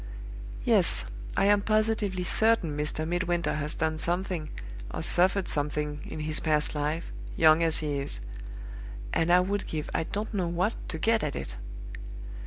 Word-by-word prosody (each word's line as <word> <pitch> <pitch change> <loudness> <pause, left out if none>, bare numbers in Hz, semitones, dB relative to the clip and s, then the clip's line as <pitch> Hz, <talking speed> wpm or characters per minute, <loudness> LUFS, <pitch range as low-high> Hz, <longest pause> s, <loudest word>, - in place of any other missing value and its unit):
Yes; - - +4 0.3
I - - +3
am 205 0 +4
positively 215 -3 0
certain 210 -5 +2
Mr. 150 +1 -1
Midwinter 175 0 0
has 150 +1 -3
done 160 0 -1
something 175 -2 -1 0.4
or - - -4
suffered 185 +2 +3
something 150 0 -2
in 155 - -6
his 155 0 +2
past 150 -2 +1
life, 150 +3 -3 0.2
young 160 0 +6
as 165 -1 +2
he 145 -2 -1
is; 140 - -4 0.9
and 165 +1 +2
I 180 +1 +6
would 200 +2 -2
give 155 -2 -4
I - - 0
don't 210 +5 -4
know 185 -4 0
what 180 +6 0 0.2
to 165 - -3
get 225 +6 +2
at 150 - -2
it. - - -6
165 Hz, 160 wpm, -28 LUFS, 150-190 Hz, 0.9 s, young